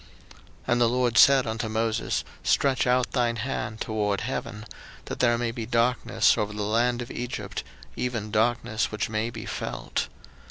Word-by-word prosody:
02:010:021 - - -18 0.3
And 120 0 +3
the 120 - +5
LORD 125 -1 +1
said 135 -2 +7
unto 110 0 -3
Moses, 110 +1 0 0.2
Stretch 135 -2 +2
out 125 0 +2
thine 120 -3 +1
hand 110 -2 -3
toward 105 -2 -1
heaven, 105 0 -4 0.4
that - - -6
there 120 -1 +3
may 120 -1 -1
be 115 -2 -5
darkness 120 +1 +2
over 105 0 -1
the 105 0 -3
land 120 +3 +1
of 120 - -10
Egypt, 125 0 -4 0.3
even 115 -4 -3
darkness 110 0 +1
which 105 0 -2
may 110 +1 0
be - - -7
felt. - - -3
115 Hz, 165 wpm, -26 LUFS, 110-125 Hz, 0.4 s, said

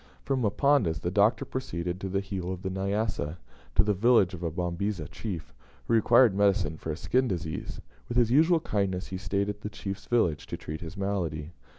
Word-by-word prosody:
From 135 -2 0
Mponda's, 105 - +2
the 85 - -1
Doctor 105 +4 +3
proceeded 90 -8 -4
to 95 - -3
the 95 +1 0
heel 95 -2 -4
of 95 -1 -6
the 95 - -2
Nyassa, 95 -4 -1 0.4
to - - +6
the 105 - +2
village 100 -2 +4
of 90 - -7
a 85 - -1
Babisa 90 +1 -2
chief, 95 -8 -6 0.3
who - - +1
required 115 0 +6
medicine 100 -5 +2
for 80 - -5
a 75 - -4
skin 130 +8 +1
disease. 85 -6 -4 0.3
With 120 - -2
his 120 -2 +4
usual 160 +4 +5
kindness, 95 -6 -1
he 95 - -4
stayed 100 0 -1
at 105 0 -4
this 105 0 -6
chief's 95 -1 -6
village 85 -12 +1
to - - -4
treat 75 0 -6
his 85 +3 -8
malady. 85 -6 -2
95 Hz, 200 wpm, -28 LUFS, 85-110 Hz, 0.4 s, to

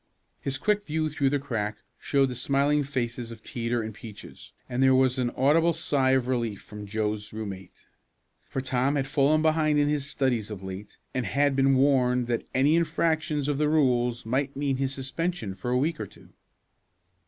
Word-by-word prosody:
His 135 -1 -3
quick 210 +3 0
view 155 0 -1
through 140 -2 +1
the 145 - +1
crack 110 -7 -3 0.2
showed 140 -2 +2
the 125 - -5
smiling 140 +4 +2
faces 120 -4 -3
of 115 -2 -11
Teeter 120 -1 -2
and 110 0 -6
Peaches, 110 -1 -11 0.2
and 125 0 -2
there 130 0 +5
was 130 0 +3
an 125 -1 +1
audible 160 +6 +4
sigh 145 -5 +1
of 130 -2 +2
relief 115 -5 -1
from 105 -1 -10
Joe's 105 0 -2
roommate. 100 -4 -8 0.6
For 135 - -2
Tom 130 +2 0
had 135 -2 0
fallen 145 +3 +2
behind 155 -1 +3
in 145 0 +3
his 145 -1 -1
studies 125 -7 0
of 100 -3 -7
late, 95 +2 -8 0.2
and 125 -4 -1
had 140 +5 +2
been 135 0 +4
warned 125 -2 +3
that 120 -1 -2
any 140 +4 +3
infractions 160 -3 +1
of 145 -1 0
the 150 -1 +2
rules 125 -6 +2
might 135 +4 -1
mean 140 -1 0
his 135 0 -1
suspension 135 - -3
for 95 +6 -5
a 125 - +2
week 150 +5 0
or 105 - -4
two. - - -18
130 Hz, 190 wpm, -27 LUFS, 120-145 Hz, 0.6 s, there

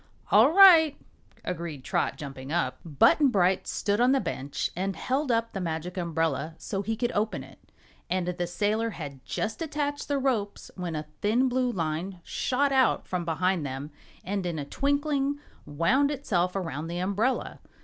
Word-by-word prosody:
"All 225 +8 +7
right," 335 -5 +8 0.5
agreed 165 -6 -5
Trot, 135 - -1
jumping 135 -1 -7
up. 170 +1 -1
Button 170 - +4
Bright 190 -6 +2
stood 205 +2 0
on 250 +2 +5
the 275 - +3
bench 145 - -3
and 190 +2 -2
held 265 - -1
up 230 0 0
the 195 - -3
Magic 170 +1 -3
Umbrella, 165 -3 -1
so 195 -3 -3
he 225 +3 -2
could 240 +2 -1
open 215 +1 -1
it, - - -15 0.5
and 185 -1 0
the 175 0 -2
sailor 215 +5 0
had 140 -9 -8
just 225 +8 -3
attached 290 -2 -2
the 285 - 0
ropes 235 -7 -2
when 175 -3 -4
a 155 0 -4 0.2
thin 235 +6 +3
blue 250 0 +1
line 170 +1 -3
shot 275 +2 0
out 265 -1 +3
from 180 -2 -2
behind 180 +1 0
them 140 +2 -5 0.3
and 195 +1 -2
in 170 -2 -3
a 145 - -4
twinkling 285 - 0 0.3
wound 225 - +2
itself 185 -11 -1
around 165 -5 -3
the 170 +1 -4
umbrella. 200 +8 -1
195 Hz, 170 wpm, -27 LUFS, 165-255 Hz, 0.5 s, right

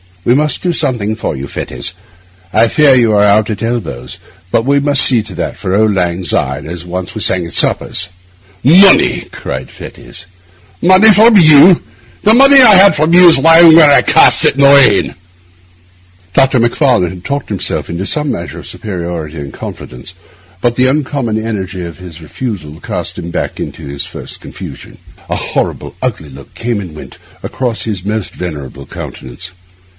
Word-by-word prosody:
We 120 - +3
must 150 -1 0
do 180 -1 -1
something 110 -8 -1
for 110 - -4
you, 70 +1 -7
Fettes. 65 -2 -6 0.6
I 115 - +3
fear 145 +2 +3
you 120 -3 +2
are 105 0 +3
out 105 +2 +2
at 105 0 -5
elbows; 115 - -5 0.3
but 115 - 0
we 140 +1 +2
must 140 -1 +2
see 120 -4 +3
to 100 -4 -11
that - - -5
for 95 - -3
auld 110 -1 +2
lang 90 -1 -2
syne, 65 -4 -3
as 85 +1 -8
once 90 +1 -6
we 110 - -6
sang 95 -2 0
at 85 - -9
suppers.' 95 - +1 0.6
'Money!' 185 +9 +5
cried 65 0 -7
Fettes; - - -10 0.6
'money 185 +5 +5
from 220 +2 +5
you! 160 +1 +6 0.4
The 215 - +4
money 275 +2 +6
that 260 - +8
I 210 - +7
had 190 -2 +6
from 155 +3 0
you 180 0 +7
is 160 - +4
lying 165 +2 +6
where 160 -3 +6
I - - +5
cast - - +4
it - - +2
in 140 - -1
the 140 - +6
rain.' 140 -8 +4 1.2
Dr. 135 +1 +2
Macfarlane 120 - +1
had 90 -1 -12
talked 140 0 -4
himself 100 -4 -3
into 85 +3 -5
some 150 -2 -2
measure 85 - -7
of - - -11
superiority 85 -5 -6
and 70 -2 -8
confidence, 60 +8 -10 0.5
but 120 -1 0
the 130 +1 +2
uncommon 130 -6 -2
energy 95 -5 -5
of 85 +1 -9
this 85 -3 -12
refusal 80 - -7
cast 85 0 -6
him 85 0 -7
back - - -5
into - - -8
his 70 0 -5
first - - -10
confusion. - - -11 0.3
A - - -2
horrible, - - -4
ugly 75 - -4
look 70 +1 -14
came 115 -2 -3
and 90 -6 -9
went - - -12 0.2
across 120 -3 -4
his 105 -5 -5
almost 105 -1 -4
venerable 70 -6 -8
countenance. 80 +9 -9
110 Hz, 180 wpm, -12 LUFS, 85-140 Hz, 1.2 s, that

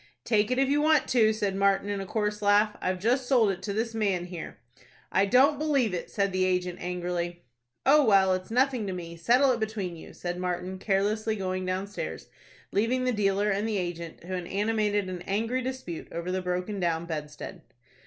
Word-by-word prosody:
"Take 215 -2 +2
it, 255 - 0
if 270 0 +3
you 290 +2 +2
want 310 -2 +3
to," 225 -4 +4
said 205 -3 -1
Martin, 195 0 +2
in 200 -1 -2
a 195 - -6
coarse 210 0 -1
laugh. 210 +1 +4
"I've 185 0 0
just 245 +6 +1
sold 235 -6 +4
it 190 - -6
to 205 - -3
this 225 +3 -2
man 200 -5 0
here." 175 -2 -7 0.5
"I 195 +1 +3
don't 270 +6 +4
believe 280 -9 +1
it," 175 - -4
said 200 -1 0
the 185 0 +2
agent, 180 -1 0
angrily. 175 -1 -3 0.4
"Oh, 295 +2 +6
well, 195 -5 +5
it's 185 0 -3
nothing 250 -2 +1
to 190 - -2
me. 170 -2 -7
Settle 245 +11 +4
it 240 - 0
between 210 -5 -3
you," 160 - -12
said 175 0 -4
Martin, 180 +1 -3
carelessly, 210 +3 0
going 185 -2 -3
downstairs, 195 +3 -4 0.4
leaving 235 +5 +1
the 255 - +2
dealer 205 0 +1
and 205 +3 0
the 210 - 0
agent 170 -3 -5
to 185 +2 -7
an 180 -2 -3
animated 210 -1 0
and 180 -1 -5
angry 225 +6 0
dispute 255 -10 -5
over 170 +2 -4
the 185 0 -1
broken 180 +3 -2
down 170 -2 0
bedstead. 150 -2 -6
200 Hz, 200 wpm, -28 LUFS, 180-225 Hz, 0.5 s, Oh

